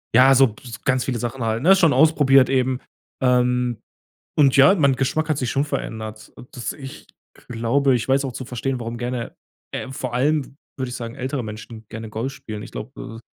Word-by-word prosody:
Ja, 135 +2 +7
so 135 0 +6
b 105 - -12 0.2
ganz 130 -1 +2
viele 125 -4 -2
Sachen 120 +1 -4
halt, 110 0 -1
ne, 190 +4 +7
schon 170 -5 +4
ausprobiert 140 -4 +5
eben. 130 -1 +1 0.4
Ähm, 125 -2 +2 0.6
und 140 -3 +5
ja, 140 +8 +8
mein 140 -7 +3
Geschmack 155 +5 -1
hat 155 - +1
sich 125 -4 -1
schon 140 0 +1
verändert, 110 -5 -5 0.2
dass 125 - -4
ich 135 -2 -10 0.4
glaube 125 +4 +2
ich 120 - -2
weiß 135 +1 +3
auch 135 - -3
zu 130 - -6
verstehen, 125 +1 -3
warum 115 0 -5
gerne 120 0 -4 0.4
äh, 130 - -4
vor 130 -2 -5
allem, 145 +3 +1
w - - -17 0.3
würde 130 -2 -3
ich 125 - -5
sagen, 115 0 -6
ältere 130 0 -3
Menschen 110 +1 -9
gerne 110 0 -7
Golf 115 +5 -3
spielen. 105 -5 -8
Ich - - -10
glaube, 110 - -8
125 Hz, 200 wpm, -22 LUFS, 115-135 Hz, 0.6 s, ja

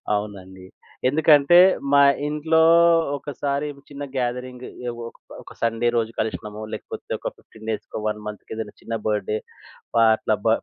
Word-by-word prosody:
అవునండి. 95 -3 -6 0.4
ఎందుకంటే 150 +2 +5 0.4
మా 140 - +7 0.3
ఇంట్లో, 155 +2 +2 0.6
ఒకసారి 140 +1 -3 0.2
చిన్న 145 0 -7
గ్యాదరింగ్ 125 0 -3 0.2
ఎ - - 0 0.2
ఒక - - -13 0.3
ఒక - - -13
సండే 115 +1 +1
రోజు 115 -1 0
కలిషినము. 105 -1 -4
లేకపోతే - - -7
ఒక - - -3
15 110 0 -15
డేస్‌కో, 110 - -5
వన్ 105 0 -2
మంత్‌కో 105 +1 -8
ఏదైనా 110 -2 -5
చిన్న 115 - -4
బర్త్‌డే 105 0 0 0.6
ఆహ్, 110 -1 +6
అట్లా 110 0 0
బ - - +3
115 Hz, 140 wpm, -23 LUFS, 105-140 Hz, 0.6 s, మా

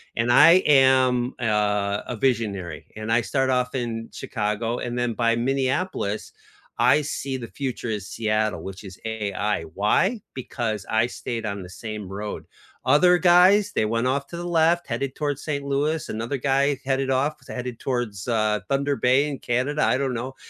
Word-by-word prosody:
and 115 +1 +1
I 170 +8 +7
am, 130 -3 +4
uh, 105 -3 0
a 125 - -4
visionary, 100 - -1
and 110 +1 -4
I 120 - +4
start 130 +6 0
off 125 0 0
in 115 -3 -3
Chicago, 110 +3 -2
and 120 0 -4
then 120 -1 0
by 115 0 +1
Minneapolis, 130 - -1 0.5
I 125 +5 +5
see 135 -2 -3
the 115 - -7
future 130 -1 -5
is 105 -3 -3
Seattle, 110 -1 -1
which 95 +1 -8
is 95 -2 -11
AI. 105 -3 -2
Why? 105 - +1
Because 115 -5 -3
I 110 +2 +2
stayed 120 -1 -5
on 100 -1 -3
the 90 - -10
same 105 +1 -7
road. 105 +2 -6 0.4
Other 180 +4 +5
guys, 185 +4 +5
they 110 - +2
went 115 +3 0
off 140 +2 -1
to 170 - -8
the 175 - -5
left, 170 0 +2
headed 130 +2 -3
towards 145 -2 -2
Saint 140 -2 -3
Louis, 150 +3 -1
another 115 +5 -3
guy 140 +2 +1
headed 135 0 0
off, 140 +4 +1
is - - -20
headed 125 -2 -5
towards, 120 -7 -3
uh, 110 -3 +1
Thunder 140 +1 +1
Bay 130 +4 +3
in 140 -2 -5
Canada, 135 +5 0
I - - +3
don't 135 -1 -1
know, 125 +3 -5
125 Hz, 175 wpm, -24 LUFS, 110-140 Hz, 0.5 s, I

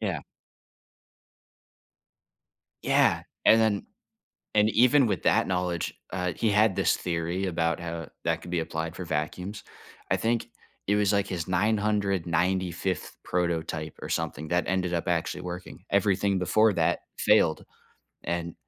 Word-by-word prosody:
Yeah. - - -2 2.6
Yeah, - - +3 0.2
and 115 - +7
then 110 -3 +1 0.7
and 105 +1 +4
even 125 +3 +5
with 100 -4 -2
that - - +3
knowledge, 90 -2 -1 0.2
uh, 90 -1 -1
he 110 - +1
had 105 -1 +3
this - - +2
theory 85 +2 -2
about 85 -2 0
how 85 -2 -5 0.2
that - - 0
could 90 - -10
be 85 - +1
applied 80 0 -4
for 90 - -5
vacuums. 85 +6 -3 0.5
I - - +4
think 115 0 0 0.4
it 100 - +2
was 105 0 +2
like 100 -1 +2
his 85 -4 -4
995th 95 -3 0
prototype 80 -3 -2
or - - -6
something 75 +2 -3
that 90 0 +1
ended 90 -1 0
up 85 +2 -2
actually 85 0 -1
working, 90 +1 -7
everything 100 0 +2
before 110 +4 +3
that 80 -2 +1 0.2
failed - - +3 0.6
and 85 -1 -3
90 Hz, 135 wpm, -27 LUFS, 85-100 Hz, 2.6 s, and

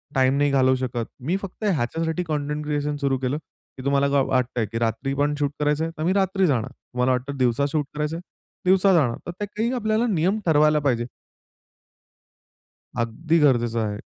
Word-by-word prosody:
Time 130 +1 +3
नाही 145 0 +2
घालवू 130 -1 +4
शकत. 125 -2 -3
मी 165 +10 -1
फक्त 195 +2 -9
ह्याच्यासाठी 165 - 0
कंटेंट 150 -1 -2
क्रिएशन 150 0 -1
सुरू 135 -1 +1
केलं 130 +3 -1 0.4
की 130 - -8
तुम्हाला 140 0 +2
का 140 -1 +3
वाटतंय 125 -3 0
की 115 - -3
रात्री 115 +4 -1
पण 145 +1 +1
शूट 145 -1 0
करायचंय, 150 +2 +1
तर 155 - -3
मी 180 +3 +2
रात्री 190 -1 +2
जाणार. 120 -6 0
तुम्हाला 125 +1 -2
वाटतं 130 +2 -2
दिवसा 125 +2 +2
शूट 150 -2 0
करायचंय, 150 +2 -2 0.5
दिवसा 190 +1 +5
जाणार. 135 -9 +2
तर - - -2
ते 205 - -1
काही 220 +4 -2
आपल्याला 220 -1 +1
नियम 190 +1 +1
ठरवायला 150 -2 +4
पाहिजे. 125 -5 0 1.9
अगदी 155 +9 0
गरजेचं 120 -5 +3
आहे. 105 -1 -2
145 Hz, 175 wpm, -24 LUFS, 130-165 Hz, 1.9 s, दिवसा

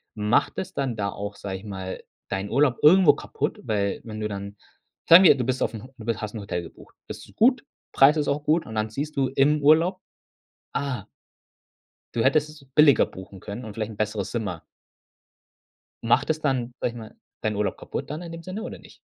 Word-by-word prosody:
macht 105 +1 +1
es 190 0 -4
dann 135 -4 -2
da 100 -2 -2
auch, 100 0 -6
sage 95 -2 -5
ich 95 - -13
mal, 95 -2 -6 0.3
deinen 100 +1 -3
Urlaub 135 0 +2
irgendwo 165 0 +7
kaputt, 145 - -4
weil, 105 -5 -1
wenn 110 -1 -7
du 105 - -1
dann 100 0 -7 0.5
sagen 170 +3 +10
wir, 170 - +8
du 130 - -2
bist 130 +1 -2
aufm 110 -2 -2
Ho 130 - -14
du 110 - -10
bi 115 - +1
hast 105 0 -6
Hotel 100 -5 -4
gebucht. 85 - -14
Das - - -6
ist - - -20
gut, 250 +3 +4 0.3
Preis 140 +3 +5
ist 150 - 0
auch 145 +1 -1
gut 155 +3 +2
und 110 - -8
dann 110 0 -1
siehst 145 +7 -5
du 135 -1 +2
im 150 +2 +3
Urlaub: 165 +6 +4 0.7
„Ah“ 130 -8 -3 1.1
Du 115 - +1
hättest 150 +4 +3
es 150 -2 -14
billiger 150 -4 +6
buchen 95 +1 -11
können 110 +4 -7
und 110 - -8
vielleicht 110 0 -4
'n 105 - -11
besseres 105 -2 -2
Zimmer. 100 -8 -4 1.4
Macht 120 +5 +2
es 155 0 +1
dann, 125 -4 -1
sage - - 0
ich - - -13
mal, 110 -2 -10 0.3
deinen 110 -1 -1
Urlaub 105 0 -1
kaputt - - -6
dann 150 +3 -5
in 170 -1 -8
dem 165 0 -8
Sinne 185 +4 -6
oder 250 - -7
nicht? - - -17
120 Hz, 210 wpm, -25 LUFS, 105-150 Hz, 1.4 s, sagen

